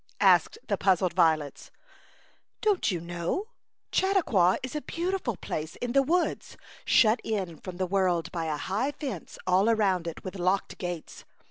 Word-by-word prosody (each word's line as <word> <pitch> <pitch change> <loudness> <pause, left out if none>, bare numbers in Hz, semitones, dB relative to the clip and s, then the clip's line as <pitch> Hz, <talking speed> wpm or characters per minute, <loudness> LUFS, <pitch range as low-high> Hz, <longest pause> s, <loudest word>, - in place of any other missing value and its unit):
asked - - +5
the - - -1
puzzled 185 -2 +2
violets. 160 -5 +1 0.5
" - - -35
Don't 415 -4 +2
you 180 -4 -1
know? 175 - -3 0.4
Chautauqua 310 - +3
is 260 +2 -5
a 300 - -2
beautiful 340 - -2
place 155 +1 -5
in 245 - -4
the 275 - +5
woods, 340 +6 -1 0.3
shut 225 0 +4
in 190 -7 -3
from 185 -2 -8
the 185 - 0
world 180 -3 0
by 165 -2 -3
a 155 -2 -1
high 215 - -1
fence 285 -4 -6
all 185 +4 +3
around 195 -6 +2
it, 165 - -6
with 185 0 -6
locked 185 +2 0
gates. 175 -3 -6
190 Hz, 160 wpm, -28 LUFS, 175-260 Hz, 0.5 s, asked